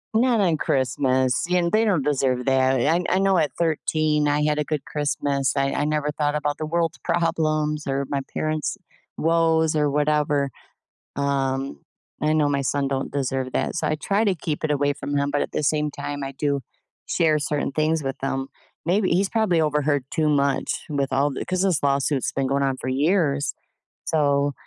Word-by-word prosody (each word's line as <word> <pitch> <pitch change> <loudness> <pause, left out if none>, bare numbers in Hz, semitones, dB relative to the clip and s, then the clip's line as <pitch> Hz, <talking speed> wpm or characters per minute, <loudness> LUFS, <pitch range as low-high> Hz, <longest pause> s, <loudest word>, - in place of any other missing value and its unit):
Not 240 0 +3
on 170 -5 +2
Christmas, 130 0 +1
and 175 -1 +2
they 220 +1 +3
don't 190 -8 +2
deserve 130 -3 0
that. 130 -1 +3
I 165 +7 +2
I - - +2
know 195 -1 +3
at 155 -3 +1
13, 155 -2 +1
I 145 +1 +1
had 150 0 +1
a 150 - +1
good 150 -1 -3
Christmas. 145 -2 -1
I 135 0 +1
I 145 - 0
never 150 -1 0
thought 145 0 -1
about 145 -1 -1
the 155 - -3
world's 165 0 -1
problems 155 -3 0
or 140 0 -1
my 140 -1 -1
parents' 155 +2 -1 0.4
woes 160 -1 +2
or 150 -1 +2
whatever. 150 -1 +1 0.7
Um, 135 - -1 0.4
I 155 +1 +2
know 150 -2 +3
my 140 -1 0
son 140 +1 0
don't 135 0 -3
deserve 135 -2 -2
that. - - -1
So 160 -2 -1
I 155 - +1
try 200 +8 0
to 195 -3 +2
keep 155 -2 -4
it 150 - +1
away 145 0 +1
from 145 0 -4
him, 140 0 +1
but 145 - 0
at - - -5
the - - -1
same 150 0 +1
time, 145 0 -5
I 135 - -5
do 140 0 -1 0.5
share 155 -2 +2
certain 145 -1 -1
things 155 +2 0
with 135 -1 -3
him. 135 0 -2 0.4
Maybe 185 +3 +1
he's 190 +3 +2
probably 205 -8 +2
overheard 150 -2 +1
too 155 -1 +1
much 140 -2 0
with 140 -3 -1
all 140 +2 +2
the 135 - -4
‘cause 185 0 0
this 185 -6 +2
lawsuit's 140 -1 +1
been 135 -1 -1
going 140 0 +1
on 135 -1 0
for 130 - -5
years. 145 0 +1 0.5
So 145 -2 +1
150 Hz, 190 wpm, -23 LUFS, 140-155 Hz, 0.7 s, Not